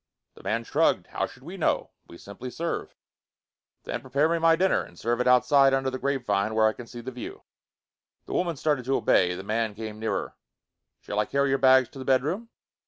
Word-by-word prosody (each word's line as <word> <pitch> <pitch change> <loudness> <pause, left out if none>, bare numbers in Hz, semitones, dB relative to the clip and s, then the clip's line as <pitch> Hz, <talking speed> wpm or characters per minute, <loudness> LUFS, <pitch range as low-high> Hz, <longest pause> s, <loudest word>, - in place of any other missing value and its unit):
The - - -16
man 115 +1 -1
shrugged. - - +1
"How - - -3
should - - -16
we - - -8
know? - - 0 0.2
We 85 - -12
simply 100 +8 -9
serve." 165 +6 -4 0.9
"Then - - -4
prepare 145 +3 +1
me 165 0 0
my 165 0 +5
dinner. 185 +3 +2
And 85 - -12
serve 120 +4 -1
it 125 - 0
outside, 135 +2 +5
under 135 0 -1
the 130 - -4
grapevine, 110 -6 0
where 110 0 +4
I 110 - +1
can 120 - -10
see 120 0 -9
the 130 +2 -6
view." 125 -1 -8 0.8
The - - -7
woman 175 -2 0
started 145 -3 0
to 135 +1 +1
obey. 90 -1 +3
The 95 - -7
man 110 +1 -1
came 110 0 -7
nearer. 110 -2 -3 0.7
"Shall 105 - -3
I 105 - +2
carry 140 0 +1
your 135 0 +1
bags 130 -1 +6
to 135 - -12
the 130 - -6
bedroom?" 150 - 0
130 Hz, 210 wpm, -26 LUFS, 110-140 Hz, 0.9 s, bags